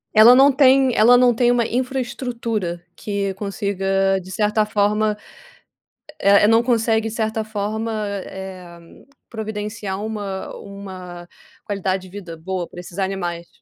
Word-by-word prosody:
Ela 225 +3 +9
não 275 +2 +7
tem 265 -1 +4
ela 240 +3 +6
não 245 -1 +5
tem 240 +1 +2
uma 240 -1 +2
infraestrutura 235 -7 -3
que 200 -2 -3
consiga 195 -1 0
de 185 - -13
certa 210 +2 +1
forma, 210 0 +1 1.0
eh, 200 +1 +5
não 225 +1 +4
consegue 225 -2 +1
de - - -8
certa 220 -1 -1
forma, 220 +1 -3 0.3
eh, 185 -3 -9 0.5
providenciar 210 -3 -5
uma 205 -3 -5
uma 185 -3 -9 0.4
qualidade 195 -2 -2
de 185 - -12
vida 180 -4 -9
boa 180 +2 -4
para - - -11
esses 175 0 -10
animais. 175 -3 -3
210 Hz, 130 wpm, -21 LUFS, 190-225 Hz, 1.0 s, Ela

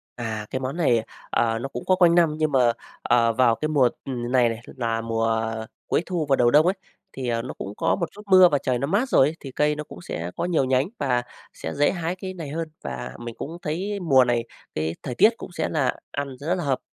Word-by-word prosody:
À, 110 -3 -4
cái 130 - -2
món 135 +5 -4
này, 120 -9 +3 0.3
ờ, 115 -1 +1
nó 135 - -4
cũng 125 - -6
có 185 - +4
quanh 175 -2 +5
năm 165 -3 +4
nhưng 155 -1 +1
mà, 125 -3 +4 0.3
ờ, 115 -1 +3
vào 120 -1 +4
cái 155 - -2
mùa, 135 -5 +4 0.2
ừ, 135 - -4 0.2
này 125 -2 +4
này 115 0 -4 0.2
là 115 -2 -1
mùa 115 0 0 0.6
cuối 170 - +1
thu 175 -4 -1
và 135 - +5
đầu 120 -2 +3
đông 150 +4 +6
ấy, 185 - +2 0.4
thì, 130 -2 -4
à, 115 -1 0
nó 125 - -6
cũng 100 - -7
có - - +2
một 170 - -3
chút 210 - -12
mưa 185 -2 +8
và 145 - +2
trời 130 -2 -1
nó 140 - -1
mát 220 - +1
rồi 135 - +5
ấy, 155 - -3
thì 135 - -8
cây 150 +3 +1
nó 150 - -4
cũng 90 - -12
sẽ 85 0 -5
có - - -2
nhiều 170 -6 +2
nhánh 130 +4 +2
và 125 -4 +1 0.3
sẽ 80 - -6
dễ 145 - +3
hái 175 0 -3
cái 185 0 -6
này 165 -6 -7
hơn. 160 +1 -4
Và 65 -1 -5
mình 120 -1 -7
cũng 165 +4 -6
thấy 195 +7 -3
mùa 135 -7 +5
này 120 -1 +1 0.3
cái 80 +2 -1
thời 125 - -4
tiết 215 - +7
cũng - - -9
sẽ 160 -2 -2
là 145 -5 0 0.2
ăn 140 -2 -4
rất 165 +6 0
hợp. 140 -7 -1
135 Hz, 250 wpm, -24 LUFS, 120-165 Hz, 0.6 s, mưa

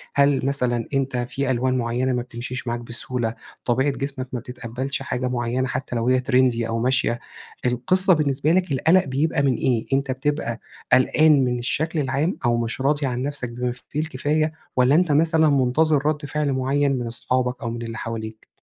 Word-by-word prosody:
هل 140 -2 +3
مثلًا 125 -4 0
أنتَ 135 -2 0
في 130 +2 -2
ألوان 130 +1 +1
معيّنة 125 +2 0
ما 125 - 0
بتمشيش 125 +1 -6
معاك 120 0 -1
بسهولة؟ 120 0 -1 0.3
طبيعة 130 +4 +2
جسمك 135 -1 -4
ما 125 - -1
بتتقبلش 125 +3 -5
حاجة 125 +1 -2
معيّنة، 125 +1 -1
حتّى 130 -1 -4
لو 115 0 -1
هي 130 0 +4
تريندي 125 -3 +2
أو 115 0 -2
ماشية؟ 125 -1 +1 0.5
القِصّة 180 +11 +4
بالنسبة 145 -1 +1
لك 185 -2 +1
القلق 160 +7 +3
بيبقى 140 +3 0
من 135 -3 +2
إيه؟ 120 -3 0
أنتَ 135 0 +1
بتبقى 130 -3 -2 0.3
قلقان 140 +2 +5
من 125 -1 -1
الشكل 155 +6 -1
العام، 140 +6 0
أو 120 0 +3
مش 120 +2 -2
راضي 145 +1 +1
عن 125 -1 -2
نفسك 140 -4 -3
بما 125 +1 -2 0.2
فيه 150 - -3
الكفاية؟ 155 +1 -1 0.2
والّا 130 +3 +4
أنتَ 175 -1 +3
مثلًا 160 +1 +3
مُنتظر 140 +2 +2
ردّ 150 -1 -1
فعل 145 -1 -1
معيّن 135 +2 +1
من 120 - -3
أصحابك 125 +2 -1
أو 115 - -3
من 120 0 -5
اللي 115 0 -6
حواليك؟ 110 -1 -6
130 Hz, 180 wpm, -23 LUFS, 120-145 Hz, 0.5 s, قلقان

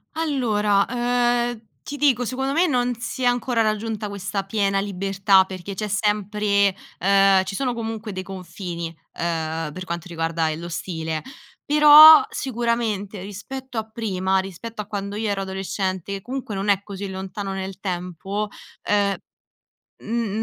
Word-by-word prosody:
Allora, 220 -10 +1
ehm, 240 -1 +1 0.2
ti 290 - -6
dico, 260 -4 +3
secondo 265 +3 -2
me 335 +5 +3
non 250 -4 +1
si 245 +2 -5
è - - +2
ancora 245 -1 +2
raggiunta 215 -1 -1
questa 200 0 -3
piena 195 -1 0
libertà, 195 0 +2
perché 190 +1 -7
c'è 215 +2 -3
sempre 205 -1 +1 0.2
ehm 195 0 +5
ci 195 - -5
sono 255 0 -1
comunque 225 -2 -5
dei 185 -1 -5
confini, 180 -2 -6 0.3
ehm, 160 -2 -2
per 185 +4 -7
quanto 170 0 -5
riguarda, 165 -1 -1
ehm, 155 0 -4
lo 170 - -6
stile. 160 -2 -3 0.4
Però 300 +1 +9
sicuramente 230 -6 -2
rispetto 245 +6 -7
a 220 0 -2
prima, 190 -4 0
rispetto 195 +4 -6
a 205 - -10
quando 200 -1 -4
io 215 0 -1
ero 200 -1 -1
adolescente 190 0 -3
che 195 - -5
comunque 255 -1 -5
non 195 +2 -2
è 200 -1 +3
così 200 0 -6
lontano 195 +1 -5
nel 190 0 -5
tempo, 190 +2 -3 0.4
ehm 200 -1 +2 0.8
n 225 -2 -2
200 Hz, 150 wpm, -23 LUFS, 190-230 Hz, 0.8 s, Però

